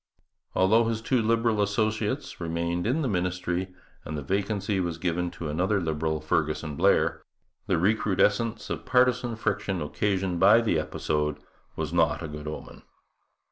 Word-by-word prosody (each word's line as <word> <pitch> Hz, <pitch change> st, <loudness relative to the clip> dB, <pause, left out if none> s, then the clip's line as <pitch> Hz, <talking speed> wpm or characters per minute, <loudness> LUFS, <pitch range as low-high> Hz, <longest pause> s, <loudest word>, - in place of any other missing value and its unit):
Although 110 Hz, +5 st, +4 dB
his 115 Hz, -1 st, -1 dB
two 120 Hz, +2 st, +1 dB
Liberal 115 Hz, -1 st, +2 dB
associates 110 Hz, +4 st, -1 dB
remained 85 Hz, +2 st, -1 dB
in 145 Hz, +7 st, +1 dB
the -, -, 0 dB
ministry, 90 Hz, -2 st, -1 dB, 0.3 s
and 75 Hz, -, -5 dB
the 70 Hz, -, -5 dB
vacancy 100 Hz, +4 st, -1 dB
was 85 Hz, -3 st, -2 dB
given 90 Hz, 0 st, -1 dB
to 85 Hz, -, -7 dB
another 95 Hz, +7 st, +1 dB
Liberal, 80 Hz, -2 st, -1 dB
Fergusson 75 Hz, -1 st, -1 dB
Blair, -, -, +2 dB, 0.5 s
the -, -, +2 dB
recrudescence 105 Hz, +3 st, +1 dB
of -, -, -3 dB
partisan 125 Hz, -2 st, +2 dB
friction 105 Hz, -4 st, -1 dB
occasioned 95 Hz, +3 st, -1 dB
by 100 Hz, +5 st, +7 dB
the 110 Hz, -9 st, +1 dB
episode 75 Hz, -1 st, -1 dB, 0.4 s
was 80 Hz, 0 st, -3 dB
not 80 Hz, 0 st, +2 dB
a -, -, -3 dB
good 75 Hz, 0 st, -8 dB
omen. 75 Hz, -, -7 dB
95 Hz, 145 wpm, -27 LUFS, 80-110 Hz, 0.5 s, by